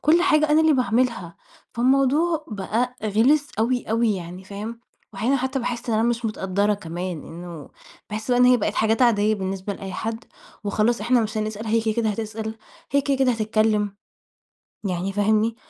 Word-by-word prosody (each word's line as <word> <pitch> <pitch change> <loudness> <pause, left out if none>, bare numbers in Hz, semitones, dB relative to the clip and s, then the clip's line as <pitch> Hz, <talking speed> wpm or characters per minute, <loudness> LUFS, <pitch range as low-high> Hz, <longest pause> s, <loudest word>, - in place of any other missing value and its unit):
كل 330 +4 +4
حاجة 305 -4 +3
أنا 305 +1 +5
اللي 315 -1 +4
باعملها 235 - 0 0.4
فالموضوع 275 +6 +2
بقى 225 +4 -2
غلس 260 +8 +3
أوي 245 +2 +1
أوي 225 -1 +2
يعني 180 +2 -8
فاهم، 215 +4 -7 0.3
وأحيانًا 230 +8 +1
حتى 265 +1 -1
باحس 240 -1 -4
إن 225 - +1
أنا 220 - +2
مش 240 0 -1
متقدّرة 205 -1 0
كمان 175 -2 -5
إنه 170 -3 -9 0.4
باحس 215 +4 -4
بقى 245 - +3
إن 250 - +7
هي 250 0 +6
بقت 210 -2 -1
حاجات 220 +3 +2
عادية 215 -2 +4
بالنسبة 190 0 -3
لأي 195 -1 -7
حد، 225 +4 -4 0.4
وخلاص 215 +3 +1
إحنا 240 +3 +3
مش 215 0 -3
هنسأل 215 +1 -3
هي 225 +1 +2
كده 220 -1 0
كده 230 -2 +1
هتسأل 220 +1 -4 0.3
هي 280 - +3
كده 275 -1 0
كده 260 -1 +3
هتتكلم 215 -2 +1 0.9
يعني 190 0 -2
فاهمني؟ 215 +2 +2
220 Hz, 170 wpm, -23 LUFS, 205-250 Hz, 0.9 s, إن